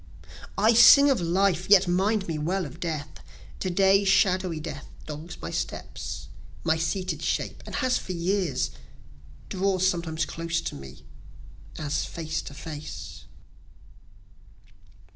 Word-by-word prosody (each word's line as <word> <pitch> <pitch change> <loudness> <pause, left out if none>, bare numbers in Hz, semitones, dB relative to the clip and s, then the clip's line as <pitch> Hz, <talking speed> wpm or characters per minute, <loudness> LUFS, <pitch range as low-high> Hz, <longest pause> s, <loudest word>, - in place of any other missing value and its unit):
I 220 +3 +5
sing 280 +5 +8
of 255 - +1
life, 180 +1 +1
yet 195 -2 +7
mind 195 +3 +1
me 160 -2 -2
well 180 +4 -1
of 140 - -10
death: 155 -4 -5 0.4
To 185 - -2
day 195 +2 +4
shadowy 185 -4 +2
Death 150 -2 -7 0.2
dogs 155 +3 -8
my - - -6
steps, - - -5 0.4
my 160 -1 +2
seated 165 0 -2
shape, - - -2
and - - -6
has 255 -2 +1
for 185 - -6
years 170 - 0 0.8
Draws 190 -1 +1
sometimes 165 -3 -1
close 165 0 -2
to - - -4
me, 70 -2 -11 0.7
as 150 -1 -1
face 160 -1 -4
to 140 - -10
face. 155 -1 -8
175 Hz, 130 wpm, -26 LUFS, 160-195 Hz, 0.8 s, sing